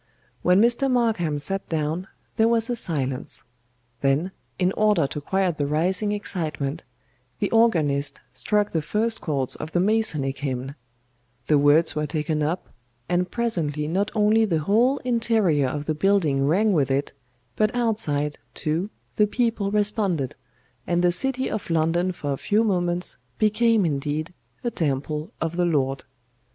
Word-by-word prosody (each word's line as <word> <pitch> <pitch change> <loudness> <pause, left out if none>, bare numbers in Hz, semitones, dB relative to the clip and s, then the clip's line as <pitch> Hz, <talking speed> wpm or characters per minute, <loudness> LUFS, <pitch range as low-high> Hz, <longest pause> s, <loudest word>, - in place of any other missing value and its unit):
"When 180 +2 +4
Mr. 240 +4 +3
MARKHAM 225 - +1
sat 195 +7 -4
down, 160 +3 -2 0.3
there 225 -1 +4
was 230 +1 +1
a - - 0
silence; 135 - -3 0.6
then, 140 +7 +1 0.3
in 180 0 +2
order 210 -7 +3
to 145 +2 -5
quiet 185 0 0
the 145 - +1
rising 180 +7 0
excitement, 165 -7 -3 0.5
the - - -1
organist 155 -12 +2
struck 210 - 0
the 160 - 0
first 220 +8 -1
chords 140 -5 -2
of 155 +1 -7
the 175 - +2
Masonic 175 -10 +1
Hymn; 135 -1 -3 0.7
the 150 -2 +4
words 145 +3 +4
were 150 0 -1
taken 155 +1 -1
up, 160 +5 -1 0.4
and 180 +1 0
presently 165 -11 -1
not 195 +6 0
only 215 +1 +4
the 170 -7 +1
whole 230 - +3
interior 225 - +2
of 145 +3 -4
the 155 - 0
building 155 -6 +2
rang 205 +7 +3
with 140 -6 +2
it, 135 +2 -1 0.4
but 215 - +2
outside, 155 -12 0 0.2
too, 165 +6 -1 0.3
the 210 - +4
people 225 -3 0
responded, 200 - 0 0.5
and 175 0 +1
the 175 - +4
city 260 +7 -1
of 215 - -4
London 165 +3 +1
for 145 -5 -3
a - - -3
few 210 +9 +1
moments 180 -4 -1 0.2
became 215 -1 +3
indeed 150 +2 -2 0.3
a 240 - -1
temple 150 -1 -2
of 165 +1 -3
the 180 - +2
Lord. 135 -5 0
175 Hz, 150 wpm, -24 LUFS, 150-210 Hz, 0.7 s, When